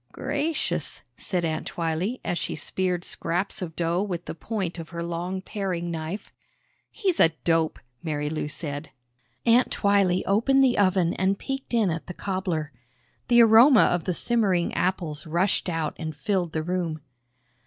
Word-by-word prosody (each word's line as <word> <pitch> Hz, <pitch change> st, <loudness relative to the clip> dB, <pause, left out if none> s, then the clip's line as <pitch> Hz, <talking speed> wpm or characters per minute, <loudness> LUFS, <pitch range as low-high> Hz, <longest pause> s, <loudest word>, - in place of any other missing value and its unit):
"Gracious," 290 Hz, +4 st, -2 dB
said 180 Hz, -3 st, -2 dB
Aunt 160 Hz, -1 st, -2 dB
Twylee 170 Hz, +8 st, -2 dB
as 175 Hz, -, -1 dB
she -, -, -3 dB
speared 180 Hz, +3 st, -2 dB
scraps 175 Hz, +5 st, -2 dB
of 165 Hz, -3 st, -5 dB
dough 170 Hz, +1 st, 0 dB
with 180 Hz, -4 st, -3 dB
the -, -, -5 dB
point 180 Hz, 0 st, -4 dB
of 165 Hz, -, -7 dB
her 170 Hz, -1 st, -5 dB
long 175 Hz, +3 st, -3 dB
paring 180 Hz, -5 st, -3 dB
knife. 165 Hz, +5 st, -5 dB, 0.6 s
"He's 380 Hz, -6 st, -1 dB
a 165 Hz, -, +7 dB
dope!" 165 Hz, -1 st, +2 dB, 0.3 s
Marilou 150 Hz, -1 st, -2 dB
said. 145 Hz, -1 st, -5 dB, 0.6 s
Aunt 240 Hz, +2 st, +5 dB
Twylee 200 Hz, -3 st, +2 dB
opened 270 Hz, +7 st, +3 dB
the 255 Hz, -2 st, +4 dB
oven 185 Hz, -3 st, +3 dB
and 190 Hz, +2 st, +1 dB
peeked 270 Hz, +3 st, -5 dB
in 215 Hz, -6 st, +3 dB
at 165 Hz, +1 st, -4 dB
the 180 Hz, -, -7 dB
cobbler. 180 Hz, -6 st, -2 dB, 0.6 s
The 240 Hz, -1 st, +7 dB
aroma 230 Hz, +4 st, +7 dB
of 175 Hz, -2 st, +1 dB
the 180 Hz, -, 0 dB
simmering 200 Hz, -7 st, +1 dB
apples 170 Hz, -4 st, -1 dB
rushed 180 Hz, +4 st, +1 dB
out 165 Hz, -3 st, -2 dB
and 160 Hz, -2 st, -4 dB
filled 175 Hz, +2 st, -1 dB
the 155 Hz, -, -1 dB
room. 170 Hz, -3 st, -2 dB
180 Hz, 155 wpm, -26 LUFS, 165-205 Hz, 0.6 s, a